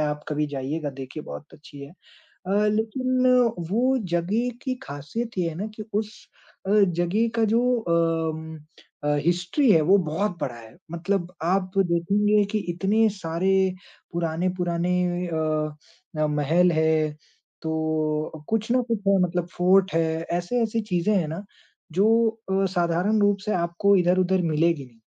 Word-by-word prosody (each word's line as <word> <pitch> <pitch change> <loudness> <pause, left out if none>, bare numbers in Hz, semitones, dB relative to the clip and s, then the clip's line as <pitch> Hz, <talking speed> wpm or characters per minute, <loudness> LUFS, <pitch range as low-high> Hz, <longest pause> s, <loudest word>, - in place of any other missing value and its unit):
आप 150 0 -4
कभी 150 0 -1
जाइएगा 145 +2 -3
देखिए 135 +3 -8
बहुत 145 - -10
अच्छी 145 -1 -13
है। 140 - -13 0.6
अ, 205 +2 +2
लेकिन 255 +4 0 0.4
वो 255 +5 +2 0.2
जगह 205 +9 0
की 260 -2 -2
खासियत 195 - -6
ये 175 -2 +1
है 160 - -6
ना, 195 +6 -4
कि 215 - -6
उस 210 +1 -4 0.4
अ, 195 - -1
जगह 200 +2 +2
का 225 - +3
जो 230 - +4 0.2
अम, 165 -3 -1 0.5
अ, 145 0 +2
हिस्ट्री 180 - +2
है, 165 - +5
वो 185 +6 +5
बहुत 180 +3 -1
बड़ा 120 - -3
है। 115 -1 -14
मतलब 175 +1 -2
आप 185 +2 +1
तो 195 - +4
देखेंगे 205 +5 +2
कि 215 - +1
इतने 205 +5 +2
सारे 170 +3 -1 0.6
पुराने-पुराने 175 +1 -1 0.4
अ 165 - -3 0.9
अ, 155 - +3
महल 155 +4 +2
है, 160 -1 +2 0.5
तो 155 -1 -2
कुछ 225 +1 -1
ना 255 - +4
कुछ 230 -2 0
है, 195 -1 +5
मतलब 175 -1 -1
फोर्ट 185 +2 +4
है, 165 - +3 0.3
ऐसी-ऐसी 225 +6 0
चीज़े 180 +4 +1
हैं 175 -5 +1
ना 165 +6 -6 0.5
जो 190 +5 +2 0.5
अ, 195 0 +2
साधारण 180 +5 +1
रूप 205 0 +3
से 210 - 0
आपको 175 +4 +2
इधर-उधर 185 +1 +2
मिलेगी 165 -2 +1
नहीं। 115 -2 -22
175 Hz, 150 wpm, -24 LUFS, 160-205 Hz, 0.9 s, है